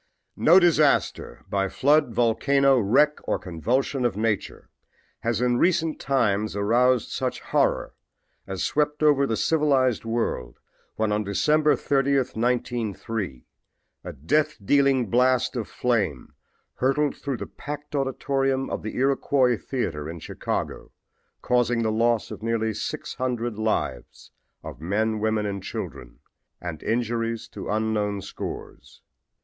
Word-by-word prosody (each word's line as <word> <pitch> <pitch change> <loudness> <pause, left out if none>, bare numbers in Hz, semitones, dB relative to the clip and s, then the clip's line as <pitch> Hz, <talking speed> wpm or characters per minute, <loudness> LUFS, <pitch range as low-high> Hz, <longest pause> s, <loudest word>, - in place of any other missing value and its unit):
No 175 +4 +6
disaster, 155 - +2
by 95 -1 0
flood, 145 +2 +3
volcano, 130 +4 +3
wreck 140 +8 +3
or - - +1
convulsion 125 - -1
of 120 -5 0
nature 110 -2 -2 0.5
has 115 0 -1
in 125 -1 +2
recent 165 -3 +1
times 110 -7 0
aroused 120 +4 +2
such - - -2
horror - - 0 0.5
as 95 -1 -3
swept 150 0 0
over 140 -2 +4
the 115 - -1
civilized 135 -4 +2
world 115 - -2 0.4
when 110 -1 0
on 105 +1 0
December 150 +9 +2
30, 140 +2 +1
1903, 115 - -2 0.6
a - - -6
death 100 - 0
dealing 135 0 +3
blast 130 +1 +2
of 115 -4 -3
flame 105 - -1 0.4
hurtled 135 +3 +1
through 140 -3 -4
the - - -5
packed 145 0 -8
auditorium 135 0 0
of - - -3
the 110 - -6
Iroquois 135 -1 +2
theater, 80 - -4
Chicago, - - -4 0.5
causing 120 -1 +2
the 110 - +1
loss 115 0 +1
of - - -7
nearly 110 -1 0
600 120 -1 -3
lives 110 - -3 0.3
of - - -9
men, 110 +5 0
women 110 0 0
and 100 -1 -3
children, - - -7 0.4
and 85 -3 -6
injuries 115 -1 -1
to - - -7
unknown 105 -2 -1
scores. - - -8
120 Hz, 125 wpm, -25 LUFS, 110-135 Hz, 0.6 s, No